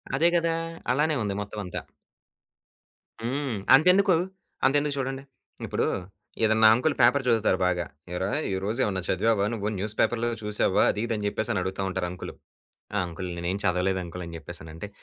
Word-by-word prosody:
అదే 160 +5 +4
గదా! 165 -1 +2 0.4
అలానే 150 +4 +2
ఉంది 100 -1 -1
మొత్తం 105 +1 -6
అంతా. 90 - -5 1.4
హ్మ్. 130 0 -2 0.2
అంతెందుకు? 185 +6 +5 0.5
అంతెందుకు 145 +2 +3
చూడండి. 135 0 -3 0.4
ఇప్పుడు - - 0 0.6
ఏదైనా 110 0 +5
అంకులు 135 +6 +1
పేపరు 125 +4 +5
జదువుతారు 110 -5 +3
బాగా. 90 -1 0 0.3
"ఏరా! 95 +2 -1 0.2
ఈరోజు 100 +6 -2
ఏమన్నా 95 -2 0
చదివావా 100 +2 +2
నువ్వు 105 -2 -2
న్యూస్‌పేపర్‌లో 110 +4 0
చూసావా?" 105 -2 +2
అది 105 - -4
ఇది 120 - -1
అని 105 -1 -3
జెప్పేసని 110 0 -1
అడుగుతా 95 +1 -3
ఉంటారు 90 -1 -2
అంకులు. 90 - -7 0.7
అంకులు 90 +1 -6
నేనేం 85 +3 -2
చదవలేదు 95 0 +1
అంకులు 90 +1 -7
అని 85 0 -8
జెప్పేసనంటే 80 +2 -7
105 Hz, 145 wpm, -26 LUFS, 95-130 Hz, 1.4 s, అంతెందుకు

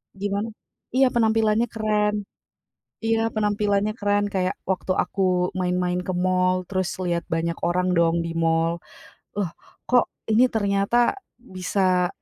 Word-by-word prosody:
Gimana? 200 +2 -2 0.5
Iya, 265 0 +5
penampilannya 225 0 +2
keren. 210 -2 0 0.9
Iya, 225 0 +1
penampilannya 210 0 +1
keren, 205 0 +2
kayak 185 -1 0
waktu 190 0 -1
aku 180 -2 +1
main-main 180 0 0
ke 185 +1 -3
mall 185 0 +1
terus 185 -1 -1
lihat 170 -1 -1
banyak 165 +1 -1
orang 180 +1 +1
dong 170 0 +2
di 165 - -3
mall. 165 0 +1 0.6
Loh 200 -4 0 0.4
kok 245 0 +4 0.3
ini 240 +4 +5
ternyata 205 +2 +2 0.2
bisa 185 -4 0
190 Hz, 125 wpm, -24 LUFS, 180-215 Hz, 0.9 s, Iya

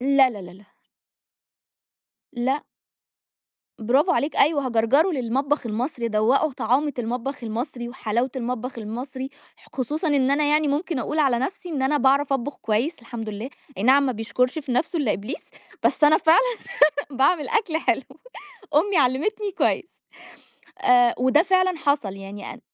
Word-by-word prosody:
لا، 270 0 +4
لا، 205 -4 -8
لا، 180 - -10
لا. 190 +3 -16 1.7
لأ. 260 +3 -1 1.1
براڤو 270 - +2
عليك، 300 0 -1
أيوه. 285 -3 +3
هاجَرْجَره 250 +9 +3
للمطبخ 270 0 -1
المصري، 235 +2 -3
ادوّقُه 235 +7 +2
طعامة 260 +5 0
المطبخ 245 +2 -4
المصري، 240 +2 -4
وحلاوة 240 +1 -2
المطبخ 250 0 -4
المصري، 260 +5 -6 0.3
ح - - -21
خصوصًا 300 +6 -2
إن 275 -2 +2
أنا 295 +1 +2
يعني 300 0 +2
مُمكن 300 +1 -1
أقول 300 +5 -3
على 265 -5 +3
نفْسي 355 +7 -4
إن 285 -5 -2
أنا 285 +3 +2
باعرف 275 +1 +3
أطبُخ 270 +2 -2
كويس 230 +10 -1
الحمد 230 -1 -7
لله، 215 +5 -6 0.3
أي 195 - -2
نعَم 270 +4 +5
ما 255 - 0
بيشكُرش 240 +6 -1
في 275 -4 -4
نفْسه 325 +7 0
إلا 245 -8 +1
إبليس، 215 +9 -5 0.4
بس 300 - +3
أنا 305 +1 +6
فعلًا 470 +9 +3 0.5
باعمل 280 - +1
أكل 425 -8 0
حلو، - - 0 0.7
أمّي 365 +5 +3
علّمِتني 315 - +1
كويس، 360 - -1 0.8
آآ 245 -1 +4
وده 260 +5 +4
فعلًا 370 -1 +2
حصل 285 -10 0
يعني 195 +1 -8
أن - - -16
265 Hz, 150 wpm, -23 LUFS, 235-300 Hz, 1.7 s, أنا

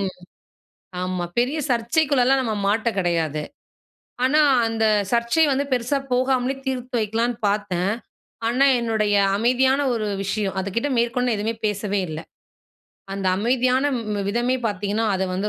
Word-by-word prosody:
ம் 190 - -1 0.9
ஆமா. 185 -1 -2
பெரிய 265 +6 0
சர்ச்சைக்குள்ளலாம் 265 +2 +2
நம்ம 225 -4 -2
மாட்ட 220 +3 +1
கிடையாது. 165 -4 0 0.8
ஆனா 295 +4 +3 0.3
அந்த 225 -1 0 0.3
சர்ச்சை 235 +7 +2
வந்து 275 +1 +1
பெருசா 250 +3 0 0.2
போகாமலே 255 +1 +1
தீர்த்து 250 -2 -3
வைக்கலாம்ன்னு 230 +3 -1
பார்த்தேன். 195 -2 0 0.6
ஆனா 255 +4 +3
என்னுடைய 220 -3 0 0.2
அமைதியான 260 +4 +2
ஒரு 215 -2 -2 0.2
விஷயம் 195 -1 -2
அதுக்கிட்ட 230 +9 -2
மேற்கொண்டு 240 0 +1
எதுவுமே 220 +2 -1
பேசவே 205 -1 -1
இல்ல. 155 0 -5 0.9
அந்த 195 -1 -3
அமைதியான 255 +4 +1 0.2
ம் 230 - -5
ம் 200 -1 -2
விதமே 240 +4 +1
பார்த்தீங்கன்னா, 205 +2 -1
அதை 190 0 0
வந்து 200 +3 -1
230 Hz, 130 wpm, -22 LUFS, 205-255 Hz, 0.9 s, ஆனா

